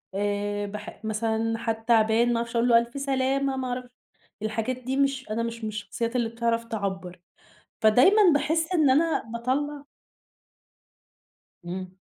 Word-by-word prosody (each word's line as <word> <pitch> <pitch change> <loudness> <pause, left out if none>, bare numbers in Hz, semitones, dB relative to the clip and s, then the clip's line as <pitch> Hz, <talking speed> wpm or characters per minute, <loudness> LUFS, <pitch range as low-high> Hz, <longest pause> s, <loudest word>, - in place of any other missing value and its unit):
آآ 205 0 -1
باح 210 +1 -8
مثلًا 225 +1 -1
حد 225 -1 -3
تعبان 230 +1 +3
ما - - +1
أعرفش 235 +1 -4
أقول 235 +1 +3
له: 230 - +7
ألف 235 +4 -1
سلامة 270 0 0
ما 260 -1 -2
أعرفش 250 0 -4 0.5
الحاجات 220 +4 -2
دي 255 +1 -3
مش 275 -3 0
أنا 225 +2 -1
مش 230 0 -5
من - - -1
الشخصيات 230 +3 -4
اللي 235 -2 +1
بتعرف 230 0 -1
تعبّر، 190 -5 -4 0.6
فدايمًا 250 - +6
باحس 320 +4 0
إن 310 -6 +4
أنا 315 +5 +2
باطلّع 280 +5 -2 1.8
إمم. 185 +1 -6
230 Hz, 145 wpm, -26 LUFS, 215-260 Hz, 1.8 s, له